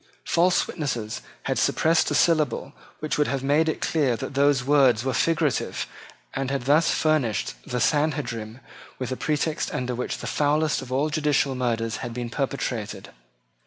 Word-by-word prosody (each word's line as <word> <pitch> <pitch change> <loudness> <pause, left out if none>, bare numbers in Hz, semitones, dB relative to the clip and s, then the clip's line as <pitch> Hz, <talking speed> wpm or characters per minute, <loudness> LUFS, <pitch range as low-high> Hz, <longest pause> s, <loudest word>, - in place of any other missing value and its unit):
False 180 +2 +3
witnesses 120 -9 -3 0.2
had - - -1
suppressed 165 +1 +2
a - - 0
syllable 155 -7 +2 0.3
which 155 -1 -2
would 150 - +3
have 135 +1 -2
made 150 +4 +3
it - - -3
clear 140 -7 +1
that 115 - -6
those 140 -1 +3
words 130 -5 +4
were 130 - 0
figurative, 150 +2 0 0.5
and 135 -1 -2
had 140 -2 -2
thus 150 +5 +4
furnished 150 -9 +1
the 125 - -2
Sanhedrim 130 -6 -1 0.4
with 130 -1 -4
a - - -1
pretext 155 +2 -1
under 125 0 -2
which 125 - -3
the - - -8
foulest 150 +1 +1
of 130 -1 -9
all 145 +4 +1
judicial 150 -2 +1
murders 115 -3 -1
had 120 -1 -6
been 120 -1 -4
perpetrated. 130 -5 -3
140 Hz, 160 wpm, -25 LUFS, 125-150 Hz, 0.5 s, words